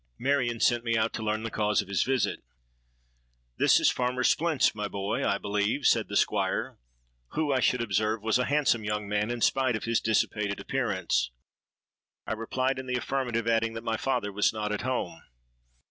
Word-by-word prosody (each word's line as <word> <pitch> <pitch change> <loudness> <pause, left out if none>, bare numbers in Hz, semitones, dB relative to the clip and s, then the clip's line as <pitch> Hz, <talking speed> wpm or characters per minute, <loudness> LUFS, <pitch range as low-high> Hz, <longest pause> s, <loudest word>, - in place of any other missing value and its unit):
Marion 125 -3 0
sent 120 0 +2
me 115 -1 +1
out 110 +1 0
to - - -4
learn 110 0 -1
the 115 - -4
cause 105 -1 +1
of - - -17
his 100 -1 0
visit. 130 -5 0 1.2
'This - - +5
is - - +5
Farmer 125 0 -1
Splint's, 160 +1 +2
my 105 -1 -3
boy, 100 +6 -2
I 100 - +1
believe?' 105 +7 -1
said - - +3
the - - -6
Squire, - - 0 0.5
who, 155 -3 0
I 130 - +2
should 125 -1 +2
observe, 110 0 0
was 110 +2 +2
a 125 - +1
handsome 140 -6 +2
young 105 0 -2
man 105 +2 0
in 120 -1 -3
spite 130 -1 +2
of 110 - -4
his 115 0 +1
dissipated 105 -2 0
appearance. - - -1 1.0
I - - -2
replied 130 +4 -1
in 130 - -7
the 125 0 0
affirmative, 120 -3 -2
adding, 115 0 +1
that 115 0 -6
my 115 -1 -1
father 120 -5 -1
was 105 +1 +2
not 105 -1 -3
at 105 - -2
home. 130 +1 -3
115 Hz, 190 wpm, -28 LUFS, 105-125 Hz, 1.2 s, This